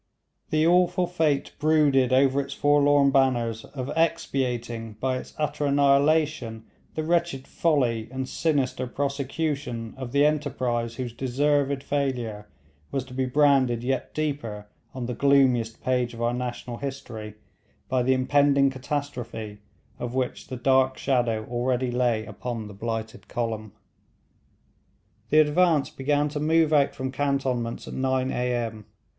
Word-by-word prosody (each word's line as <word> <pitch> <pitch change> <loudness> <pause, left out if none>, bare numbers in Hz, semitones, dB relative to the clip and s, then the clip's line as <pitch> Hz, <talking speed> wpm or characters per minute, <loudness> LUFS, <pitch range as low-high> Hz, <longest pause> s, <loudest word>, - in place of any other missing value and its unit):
The 155 0 +2
awful 180 +1 +3
fate 160 -5 0
brooded 145 -4 +3
over 135 +1 +4
its - - -7
forlorn 145 -1 +4
banners 120 -5 +1
of 135 0 -6
expiating 125 -8 -1
by 130 +4 -1
its - - -12
utter 150 -1 -1
annihilation, 140 -3 +2 0.3
the 155 - -1
wretched 170 -5 0
folly 125 -9 +1
and 130 0 -4
sinister 135 -6 0
prosecution 140 -3 -3
of 130 -2 -6
the 140 +2 +4
enterprise 125 -6 -1
whose 125 -2 -5
deserved 140 +2 0
failure 120 -7 -2 0.4
was 135 -2 -2
to 130 - -12
be 130 0 -1
branded 130 -4 +3
yet 130 +1 -2
deeper 135 -9 -3 0.3
on 125 -2 -4
the 125 - -3
gloomiest 125 -4 +2
page 125 -2 0
of 115 - -8
our 120 +1 +1
national 120 -1 -4
history, 120 -6 -6 0.5
by 130 0 +1
the 130 +2 +3
impending 140 +1 +3
catastrophe 125 -6 -5 0.4
of 120 0 -4
which 130 -1 -2
the 130 - -6
dark 130 +1 +3
shadow 120 -5 0
already 125 +1 -1
lay 120 -3 +1
upon 110 +1 -5
the 105 - -10
blighted 115 +2 -5
column. 110 -3 -3 1.6
The 155 - +3
advance 155 -1 +2
began 145 +2 0
to 150 +1 -4
move 160 +1 +3
out 145 -2 +3
from 130 0 -3
cantonments 130 -4 -1
at - - -7
nine 130 0 0
A.M. 120 -4 -2
130 Hz, 135 wpm, -25 LUFS, 120-145 Hz, 1.6 s, over